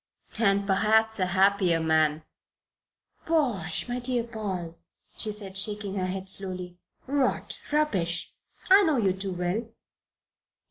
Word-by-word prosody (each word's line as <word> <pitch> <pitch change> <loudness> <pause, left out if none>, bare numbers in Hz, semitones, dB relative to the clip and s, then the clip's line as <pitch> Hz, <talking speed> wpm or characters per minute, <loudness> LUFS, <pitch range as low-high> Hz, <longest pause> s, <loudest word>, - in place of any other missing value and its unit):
"And 200 -2 +3
perhaps 220 +2 +2
a 185 - +2
happier 190 -2 +3
man." 155 -1 +2 1.0
"Bosh, 240 - 0
my 245 0 -2
dear 245 -1 -1
Paul!" 190 -7 -5 0.4
she 215 - -1
said, 200 -2 -6
shaking 205 0 0
her 185 -2 -1
head 190 +1 -4
slowly. 185 -2 -4 0.3
"Rot! 275 0 -1
Rubbish! 195 - 0 0.4
I 390 +2 +9
know 315 -7 +2
you 195 -5 +2
too 190 0 -4
well. 180 +5 -1
195 Hz, 125 wpm, -27 LUFS, 180-225 Hz, 1.0 s, I